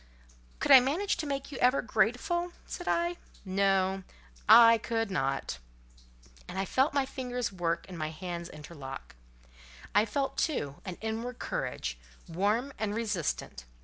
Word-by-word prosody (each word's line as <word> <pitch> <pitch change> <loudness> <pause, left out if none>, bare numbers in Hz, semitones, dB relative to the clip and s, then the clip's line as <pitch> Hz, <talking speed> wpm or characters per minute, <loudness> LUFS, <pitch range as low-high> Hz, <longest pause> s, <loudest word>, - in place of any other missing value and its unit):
"Could - - +1
I 265 - +12
manage 310 +11 0
to 310 - -3
make 275 0 -3
you 270 - -6
ever 250 +2 +3
grateful?" 345 +11 0
said 355 - -7
I. 345 +1 +1 0.3
"No, 195 0 +2 0.5
I 230 +1 +9
could 225 -2 -2
not." 135 - -1 0.9
And 190 - -7
I 195 - 0
felt 265 +7 +1
my 280 -1 +3
fingers 250 -3 -3
work 175 -3 -1
and 180 -3 -8
my 155 0 -2
hands 170 +1 -6
interlock: 145 - -9 0.8
I 205 +1 +5
felt, 270 +5 -2
too, 145 - -1
an 185 -3 -5
inward 225 +3 -3
courage, - - -3 0.3
warm 210 +10 0
and 210 -1 -1
resistant. 190 - -2
220 Hz, 145 wpm, -30 LUFS, 175-260 Hz, 0.9 s, I